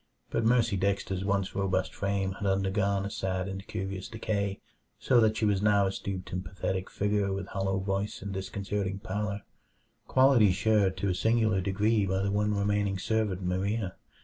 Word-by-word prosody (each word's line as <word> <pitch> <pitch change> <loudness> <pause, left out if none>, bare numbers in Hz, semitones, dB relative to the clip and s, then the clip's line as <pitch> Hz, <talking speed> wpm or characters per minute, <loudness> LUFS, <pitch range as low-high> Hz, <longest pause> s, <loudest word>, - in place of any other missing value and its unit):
But 115 - 0
Mercy 115 -3 +3
Dexter's 95 -1 -1
once 100 -1 0
robust 95 -1 0
frame 100 -1 -1
had 100 +1 -4
undergone 95 +1 +1
a 100 - -4
sad 95 -1 -2
and 95 +1 -6
curious 95 0 -4
decay, 105 -3 -2 0.4
so 125 - +3
that 110 0 +3
she 110 - +1
was 100 -2 +2
now 100 -1 +4
a 95 - 0
stooped 95 -1 -5
and 90 0 -2
pathetic 95 +1 -3
figure 100 -1 0
with 95 +1 -4
hollow 95 0 -1
voice 95 +2 -2
and 100 -1 -4
disconcerting 100 0 -3
pallor 100 +1 -3 0.6
qualities 130 -8 +5
shared 100 -2 +2
to 100 +2 0
a - - +2
singular 110 0 +2
degree 100 +2 +1
by 95 +1 0
the 100 - 0
one 105 +1 +1
remaining 100 -1 +1
servant 105 -2 -1
Maria. 95 +2 -1
100 Hz, 175 wpm, -29 LUFS, 95-105 Hz, 0.6 s, qualities